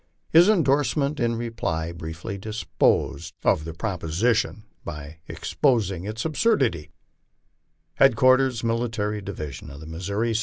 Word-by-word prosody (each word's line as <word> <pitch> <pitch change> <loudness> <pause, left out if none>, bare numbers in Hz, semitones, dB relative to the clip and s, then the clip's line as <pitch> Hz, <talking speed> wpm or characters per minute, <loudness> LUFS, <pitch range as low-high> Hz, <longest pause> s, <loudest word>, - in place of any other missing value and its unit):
His 170 +5 +7
in 200 -6 +4
dorsement 145 +1 +1
in 120 -1 +1
reply 110 -9 -3
briefly 85 +4 -6
disposed 110 +3 0
of 75 - +2
the 80 - -6
proposition 100 +5 0 0.2
by 75 +1 -8
exposing 100 - 0
its 110 +2 -4
absurd 160 +3 +2
ity: 85 -10 -2 1.1
HEADQUARTERS 130 -1 +4
MILITARY 115 -3 -1
DIVISION 80 -8 -7
OF 70 0 -10
THE 80 - -10
MISSOURI, 100 +8 -2
ST. 110 - +1
110 Hz, 125 wpm, -24 LUFS, 85-125 Hz, 1.1 s, His